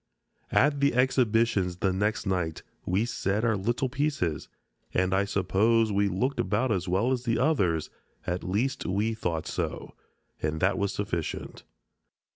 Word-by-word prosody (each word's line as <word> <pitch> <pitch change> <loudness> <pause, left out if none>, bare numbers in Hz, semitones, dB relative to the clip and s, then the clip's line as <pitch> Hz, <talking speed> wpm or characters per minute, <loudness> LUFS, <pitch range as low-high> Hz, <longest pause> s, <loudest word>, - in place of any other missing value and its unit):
At 145 0 +3
the 140 -3 +2
exhibitions 115 -7 +2
the 95 0 +1
next 105 +4 0
night 90 -5 -1 0.2
we 95 +5 +2
said 110 -2 -1
our 110 -2 +2
little 120 +6 0
pieces, 130 - -1 0.5
and 95 +1 +2
I 100 +1 +2
suppose 105 +4 +2
we 100 0 +2
looked 110 +9 -1
about 110 +6 +1
as 95 -3 -1
well 95 +8 +1
as 125 -2 -1
the 115 -2 +1
others; 100 - +1 0.3
at 90 0 -2
least 115 +10 -1
we 105 +4 0
thought 85 -7 -2
so, - - -4 0.5
and 80 +1 -1
that 95 +3 +2
was 100 0 0
sufficient. 85 -6 -4
100 Hz, 150 wpm, -28 LUFS, 95-120 Hz, 0.5 s, At